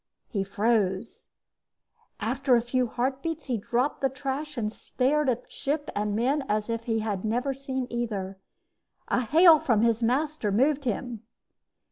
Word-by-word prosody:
He 200 -4 -1
froze. 200 0 0 0.9
After 250 +4 +2
a 235 - +3
few 250 +1 0
heartbeats, 275 +7 -2
he 250 -4 -1
dropped 245 +7 -1
the 270 - +2
trash 275 +2 -4
and 215 -2 -2
stared 275 +5 0
at 245 0 -2
ship 290 +1 -2
and 210 0 -1
men 270 +6 +1
as 210 +2 0
if 230 0 -3
he 225 -2 0
had 205 -4 -2
never 245 +5 0
seen 265 -1 -3
either. 200 -5 -3 0.7
A - - +2
hail 320 +6 +7
from 230 -6 +2
his 230 0 +2
master 260 -1 0
moved 275 +6 +2
him. 240 -1 -3
245 Hz, 150 wpm, -27 LUFS, 220-275 Hz, 0.9 s, hail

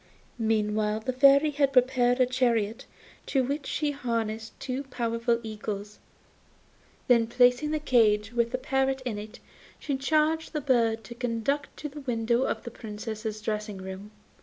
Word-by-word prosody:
Meantime 215 -1 +1
the 255 - -1
Fairy 280 +3 +6
had 280 -1 +2
prepared 250 -1 +3
a 255 - +6
chariot, 240 -2 0 0.4
to 265 -2 +2
which 280 +2 -3
she 300 -2 -1
harnessed 225 -5 -3
two 260 +1 -3
powerful 235 -2 -1
eagles; 210 -1 -6 1.1
then 235 -3 +4
placing 245 +4 +3
the 310 - 0
cage, 225 -6 +2
with 235 -1 +1
the 255 - -2
parrot 265 0 0
in 220 -4 -3
it, 210 +1 -10 0.4
she 285 - -3
charged 310 +4 +1
the 305 - 0
bird 230 -4 +2
to 235 - -9
conduct 245 +4 -1
it - - -33
to 300 - -5
the 295 +1 -9
window 240 -1 0
of - - -2
the 235 - -7
Princess's 215 0 -6
dressing 210 -1 -3
room. 190 +2 -8
240 Hz, 160 wpm, -27 LUFS, 220-265 Hz, 1.1 s, Fairy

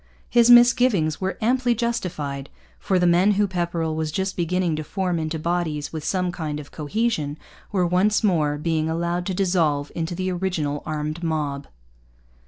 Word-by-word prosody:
His 235 0 +5
misgivings 240 - +5
were 190 +1 -2
amply 245 +1 +2
justified; 165 - -3 0.3
for 190 - 0
the 180 - +2
men 180 +4 +4
whom 205 +1 +2
Pepperrell 170 -3 -2
was 160 -1 -2
just 190 +3 -2
beginning 175 -1 0
to 155 - -3
form 180 0 -2
into 160 0 -2
bodies 160 -3 -2
with 155 -2 -5
some 180 +2 0
kind 155 -4 -4
of 145 - -11
cohesion 155 -2 -2 0.3
were 185 -4 +1
once 190 +6 +2
more 155 -7 +2
being 160 0 -1
allowed 170 +2 -1
to 190 - -2
dissolve 165 -7 +1
into 165 +1 -3
the 185 +1 -2
original 175 -6 -2
armed 155 +1 -3
mob. 150 -4 -2
170 Hz, 165 wpm, -23 LUFS, 155-190 Hz, 0.3 s, His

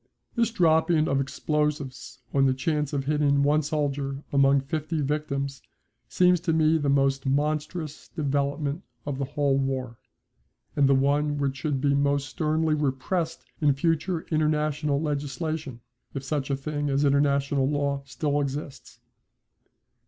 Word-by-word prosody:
This 230 -2 +2
dropping 160 -5 +3
of 135 0 +1
explosives 145 -2 -2
on 135 -1 +4
the 130 - +2
chance 150 +1 -1
of 140 -2 -2
hitting 145 -1 +2
one 150 +2 +3
soldier 145 -2 -2
among 140 0 +4
fifty 155 +3 -3
victims 140 -2 -2 0.5
seems 180 -1 +4
to 165 -1 0
me 160 0 +3
the 145 -2 0
most 135 0 +2
monstrous 150 +2 -2
development 140 +1 -1 0.2
of 140 -2 -3
the 140 - 0
whole 140 0 +1
war, 130 -3 -3 0.8
and 140 -1 +4
the 135 - +5
one 145 +2 +1
which 140 -1 -1
should 145 -1 -1
be 140 0 +2
most 140 0 +1
sternly 155 +2 0
repressed 150 +4 -1 0.2
in 145 -3 +4
future 165 +3 0
international 150 -2 +1
legislation 145 -2 -3 0.3
if 135 - -3
such 140 0 -2
a 140 - +1
thing 145 +1 -3
as 140 +1 +2
international 140 -1 +2
law 140 -1 0
still 140 +2 -1
exists. 140 0 -6
145 Hz, 140 wpm, -26 LUFS, 140-155 Hz, 0.8 s, the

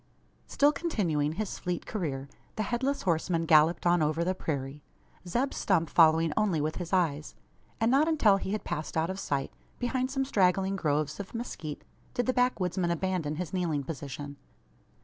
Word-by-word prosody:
Still 290 +1 +4
continuing 170 - -1
his 205 +3 -4
fleet 180 -1 -3
career, 140 -10 -3 0.3
the 215 - -1
Headless 260 +6 -1
Horseman 165 -1 0
galloped 160 +2 +4
on 175 -1 +4
over 155 +2 +1
the 185 +2 +1
prairie 140 -4 -4 0.5
Zeb 245 +10 0
Stump 165 -6 +1
following 160 -1 +5
only 200 -7 +1
with 155 +1 -2
his 175 -2 -5
eyes; 160 -6 0 0.4
and 225 +1 +2
not 285 +4 +4
until 225 -12 +4
he 195 - -4
had 215 - -2
passed 155 +1 -4
out 160 +3 +1
of 190 - -6
sight, 140 -7 -2 0.3
behind 255 +1 -1
some 270 0 -1
straggling 190 -4 +2
groves 150 -3 -1
of 200 +3 -7
mezquite, 160 -10 -5 0.3
did 245 - +1
the 255 - +1
backwoodsman 185 -8 +1
abandon 170 -3 -1
his 180 +3 -5
kneeling 165 -6 0
position. 140 0 -6
175 Hz, 170 wpm, -29 LUFS, 155-215 Hz, 0.5 s, following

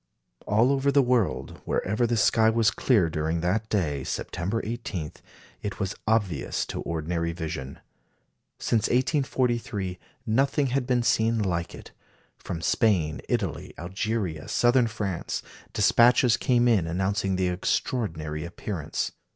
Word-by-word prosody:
" - - -29
All 110 +6 +4
over 140 0 +2
the 140 0 +4
world, 120 -5 0
wherever 110 +5 0
the 120 0 0
sky 110 +1 +4
was 110 -1 +3
clear 110 -10 +2
during 80 +1 -1
that 105 +6 0
day, 75 -10 0
September 95 +11 -3
18, 105 -9 -4 0.5
it 100 -1 -5
was 100 -1 -1
obvious 105 -10 0
to - - -5
ordinary 85 +1 -2
vision. 80 -5 -5 0.8
Since 110 -3 +1
1843 120 - 0 0.3
nothing 135 +5 +2
had 135 -2 0
been 125 -2 +2
seen 115 0 +2
like 90 -5 -1
it. - - -12 0.5
From 80 -1 -5
Spain, 85 -9 +2
Italy, - - -2
Algeria, 95 -2 -3
Southern 120 0 +3
France, 105 -5 -3 0.3
despatches 120 +3 +5
came 125 -1 +2
in 105 -9 +3
announcing 95 +3 0
the 90 -1 +1
extraordinary 80 -5 -2
appearance. 85 -1 -4
105 Hz, 130 wpm, -26 LUFS, 85-120 Hz, 0.8 s, despatches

